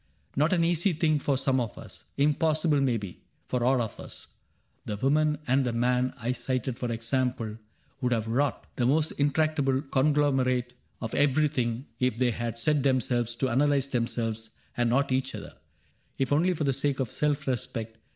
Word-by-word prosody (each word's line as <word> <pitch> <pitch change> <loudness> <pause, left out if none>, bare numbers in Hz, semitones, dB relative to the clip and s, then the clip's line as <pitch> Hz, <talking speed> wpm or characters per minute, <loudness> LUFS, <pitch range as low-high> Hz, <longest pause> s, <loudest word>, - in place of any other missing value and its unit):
Not 155 +4 +2
an 175 -2 +3
easy 170 +2 +2
thing 155 -1 +2
For 140 -1 0
some 130 0 +2
of 115 -4 -3
us; - - -11
impossible, 150 +1 +2
may 125 -4 +2
be. 100 -5 -8 0.2
For 125 -1 -1
all 130 +1 +3
of 110 - -7
us: - - -9 0.5
the 105 - -4
woman 150 +5 +2
and 130 +2 +3
the 125 -2 -1
man 125 +2 +1
I 120 0 -2
cited, 125 0 -2
for 120 -1 -2
example, 115 -1 -1 0.4
would 125 -1 0
have 115 -2 0
wrought 135 +5 0
The 120 - +2
most 155 +3 +2
intractable 145 -2 +2
conglomerate 135 -3 +1 0.3
Of 115 -2 -4
everything, 135 -4 +1
if 125 -3 +1
they 125 -1 +2
had 115 0 -4
set 150 +4 +1
themselves 120 -3 +1
To 130 +2 0
analyze 140 +2 +2
themselves 115 -3 -2 0.3
and 120 -1 +1
not 135 +3 +2
each 130 0 0
other; - - -8 0.6
If 135 +1 0
only 175 +5 +3
for 155 - -2
the 135 -2 +2
sake 140 +1 0
of 130 -4 -2
self 150 0 0
respect. 115 -3 -3
130 Hz, 175 wpm, -28 LUFS, 120-145 Hz, 0.6 s, an